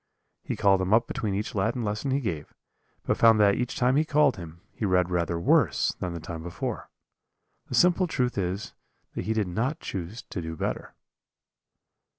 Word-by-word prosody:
He - - -3
called 95 -1 +3
him 95 +4 +3
up 115 +1 +3
between 105 -4 -3
each 105 +2 -3
Latin 115 +5 0
lesson 105 +6 -2
he 135 +2 +1
gave, 80 - -4 0.5
but - - 0
found 115 -1 +6
that 100 -1 +5
each 125 +3 -2
time 125 +2 +3
he 155 - +4
called 150 -1 +3
him, 85 -3 -10
he - - -7
read 90 -2 +2
rather 85 -1 0
worse 85 - +3
than 90 -2 -3
the 85 - -5
time 80 0 -7
before. 85 +1 -5 0.8
The - - -3
simple 180 +1 +4
truth 125 -6 -1
is 95 +1 -3 0.4
that - - -4
he 110 - 0
did 110 -3 0
not 115 - -1
choose 95 +5 -6
to 90 - -6
do 80 0 -5
better. - - -4
100 Hz, 185 wpm, -27 LUFS, 90-120 Hz, 0.8 s, found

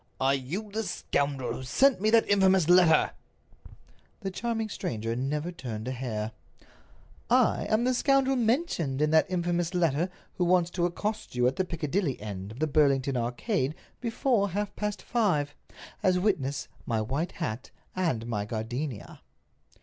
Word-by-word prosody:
"Are 135 +1 +3
you 165 +11 -4
the 220 +2 -1
scoundrel 140 - -1
who - - -6
sent 245 - +3
me 215 - +3
that 225 0 +4
infamous 190 -4 +4
letter?" 175 -3 +5 1.1
The 195 -2 -3
charming 225 +3 -2
stranger 115 - -3
never 150 +7 -2
turned 115 -8 -6
a - - -1
hair. 115 -4 -3 1.0
"I - - +3
am 215 +2 +2
the 255 +1 +2
scoundrel 270 +1 +3
mentioned 225 - 0
in 150 0 +2
that 160 0 +4
infamous 175 -1 -1
letter 165 0 +2 0.3
who 180 - +3
wants 175 -1 +3
to 175 -1 +1
accost 210 0 -4
you 125 0 +2
at 130 +2 +1
the 190 - +1
Piccadilly 165 -2 -1
end 100 -1 -6
of 115 - -10
the 155 - +2
Burlington 140 -3 +2
Arcade 130 - -1 0.2
before 230 -3 +1
half 205 +2 -3
past 210 -1 -3
five—as 185 -2 -1
witness 155 -9 0 0.2
my 115 -3 +1
white 135 +10 -2
hat 125 -8 -4 0.3
and 160 -12 0
my 110 -4 -2
gardenia." 115 +4 -5
165 Hz, 150 wpm, -28 LUFS, 130-200 Hz, 1.1 s, letter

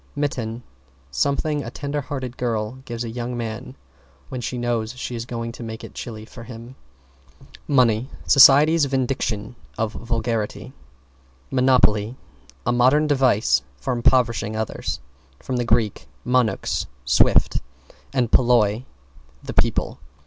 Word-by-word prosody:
=MITTEN= 125 -5 -3 0.5
Something 140 - 0
a 115 - -5
tender 145 +4 -3
hearted 130 -3 -5
girl 115 0 -2
gives 120 -1 -4
a 115 - -5
young 120 +1 -4
man 120 +3 -5 0.5
when 130 -1 -5
she 125 - -3
knows 120 -2 -1
she 125 - -5
is 115 0 -5
going 115 -1 -4
to 115 - -11
make 110 -1 -7
it - - -9
chilly 110 -2 -7
for 115 - -12
him. 115 +1 -10 0.9
=MONEY= 125 -3 +3 0.2
Society's 145 +3 +7
vindication 125 -4 -2 0.2
of 110 0 -1
vulgarity. 115 +1 -3 0.8
=MONOPOLY= 125 -4 +3 0.5
A 120 - +2
modern 130 +5 +4
device 130 - +3 0.2
for 70 - -2
impoverishing 115 -3 +2
others. 110 -1 -3 0.4
From 130 - -4
Grk. 115 -3 +1 0.2
monux, 125 -2 +1 0.2
swift 65 - +4
footed, - - -19 0.5
and 125 -4 0
polloi, 120 -2 +3 0.6
the - - -6
people. - - 0
120 Hz, 125 wpm, -22 LUFS, 115-130 Hz, 0.9 s, Society's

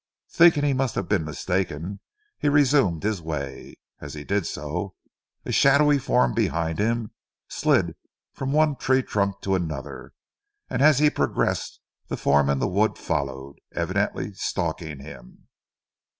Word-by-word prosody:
Thinking 165 -4 +5
he 145 -1 +2
must 130 -2 -1
have 95 - -2
been 95 -6 +1
mistaken, 90 +3 -3 0.4
he 145 - +2
resumed 140 - +3
his 105 -3 -1
way. 75 -4 -6 0.2
As 75 0 -8
he 75 - -7
did 100 +2 -1
so, - - -4 0.5
a - - -3
shadowy 145 +1 +5
form 65 - +2
behind 80 0 -1
him 115 0 0 0.4
slid - - +1 0.4
from 135 0 -3
one 150 -1 +3
tree 130 0 +2
trunk 100 -3 -1
to 95 - -1
another; 80 -7 -4 0.6
and - - -1
as 150 -1 +6
he 150 +1 +4
progressed - - -1 0.3
the - - -4
form 70 0 +3
in 70 - +2
the - - 0
wood 100 +4 +1
followed, 70 0 -3 0.2
evidently 95 +4 -1
stalking 80 -5 -3
him. 60 -4 -13
95 Hz, 145 wpm, -24 LUFS, -, 0.6 s, as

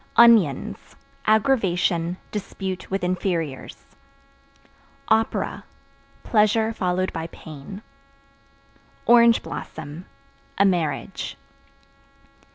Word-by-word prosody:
Onions 225 - +4 0.3
Aggravation, 185 -7 +2
dispute 190 -2 -5
with 195 -1 -2
inferiors. 175 -6 -3 1.2
Opera 220 0 +1 0.6
Pleasure 220 +1 +2
followed 185 -2 -1
by 165 0 -4
pain. 160 +6 -10 1.2
Orange 235 -1 +6
Blossom 160 +3 -8 0.5
A 200 - +5
marriage. 175 -6 -1
185 Hz, 65 wpm, -23 LUFS, 170-220 Hz, 1.2 s, Orange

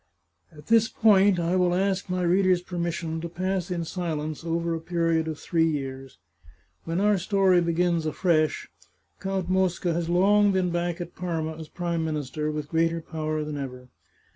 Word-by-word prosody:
At 150 -2 -15
this 230 0 +4
point 200 -5 +4
I 170 +2 0
will 180 -1 +2
ask 195 +1 0
my 180 0 -1
readers' 180 0 +3
permission 170 -2 -3
to 170 - -5
pass 185 +1 -2
in 170 -2 -2
silence 155 -3 -4
over 170 0 -1
a 165 - -2
period 165 -1 0
of 160 -2 -4
three 165 +1 +1
years. 135 -3 -5 0.7
When 165 +2 -1
our 205 -1 +3
story 190 -1 +3
begins 170 -1 +1
afresh. 155 0 +1 0.5
Count 190 -2 -2
Mosca 185 -2 +1
has 170 0 -2
long 200 +3 +4
been 185 -2 +1
back 175 0 -2
at 175 0 -7
Parma 165 -3 -3
as 160 -1 -9
Prime 170 -2 -2
Minister, 150 -1 -3
with 150 -1 -4
greater 165 0 +1
power 155 -1 -3
than 150 -1 -5
ever. 125 -2 -7
170 Hz, 165 wpm, -26 LUFS, 160-185 Hz, 0.7 s, this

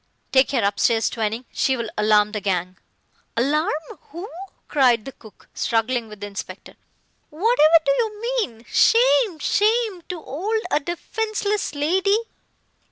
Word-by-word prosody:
"Take 265 0 +4
her 255 -6 0
upstairs, 225 +3 +1
Twining. 225 +2 -3
She 265 -1 +1
will 230 -2 -4
alarm 210 0 +3
the 210 -1 -4
gang!" 185 -2 -2 0.6
"Alarm 295 +6 +1 0.4
who?" 340 +6 -7 0.4
cried 245 -6 +3
the 270 - -6
cook, 220 -6 -18
struggling 230 +1 0
with 210 -1 -12
the - - -3
inspector. 205 -1 -8 0.6
"Whatever 330 -2 +4
do - - +3
you 450 -4 -1
mean? 450 - -2
Shame 485 -5 +4
shame 425 +3 +1
to 360 -2 -4
'old 410 - -3
a - - +3
defenceless 410 +3 -3
lady. 375 +8 +2
290 Hz, 135 wpm, -22 LUFS, -, 0.6 s, Take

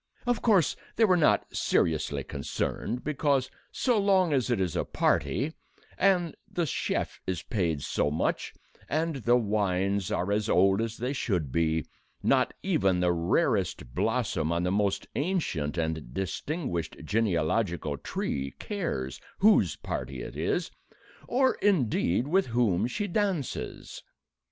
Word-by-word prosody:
Of 245 -2 +1
course 200 -9 +3 0.2
they 225 - +5
were 185 -3 +4
not 160 -4 +3
seriously 75 -3 +1
concerned, 105 - -3
because, 140 -3 +1 0.2
so 245 -4 +1
long 190 -5 +3
as 130 -3 +1
it 120 -4 +1
is 90 -3 -1
a - - +1
party, 140 - 0 0.4
and 180 -4 +2 0.2
the 175 - 0
chef 145 - -2
is 90 -4 -2
paid 85 - -1
so - - 0
much, 75 - -1 0.4
and 160 0 0
the 120 -1 +3
wines 100 -3 0
are 90 +3 0
as 105 +1 0
old 95 +3 +4
as 115 0 -3
they 125 +4 -2
should 90 - -1
be, 80 0 +1 0.4
not - - +3
even 95 -2 +2
the 90 0 +3
rarest 90 - 0
blossom 80 - 0
on 85 +1 0
the 90 - +1
most 100 0 +1
ancient 140 - -1
and 80 -6 -3
distinguished 95 - -3
genealogical 85 -4 0
tree 70 0 -3
cares 165 - -3 0.2
whose 195 - +4
party 65 -1 -5
it - - -8
is, - - -1 0.6
or, 260 +2 +3
indeed, 125 - +2
with 190 +3 +2
whom 115 -4 +2
she 205 - -2
dances. 195 - -2
105 Hz, 135 wpm, -28 LUFS, -, 0.6 s, they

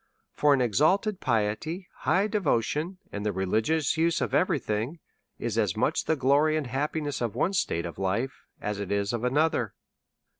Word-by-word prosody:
For 145 -1 +4
an 130 - 0
exalted 180 - +2
piety, 130 - -1
high 190 +3 +2
devotion, 180 - 0
and 105 - -4
the 105 - 0
reli 95 +2 +1
gious 160 +5 0
use 165 +1 +2
of - - -2
every 180 -3 +3
thing, 115 +6 -2 0.4
are - - -5
as - - 0
much - - +1
the 160 - +2
glory 145 +3 +3
and 155 - -2
happiness 145 +2 -2
of 115 -4 -2
one 190 - +1
state 85 - 0
of 85 +2 -7
life 110 +8 -2
as 105 -1 -3
it 100 -1 -4
is 100 +1 0
of 120 - -1
anotlier. 125 -2 +1
135 Hz, 180 wpm, -27 LUFS, 105-160 Hz, 0.4 s, For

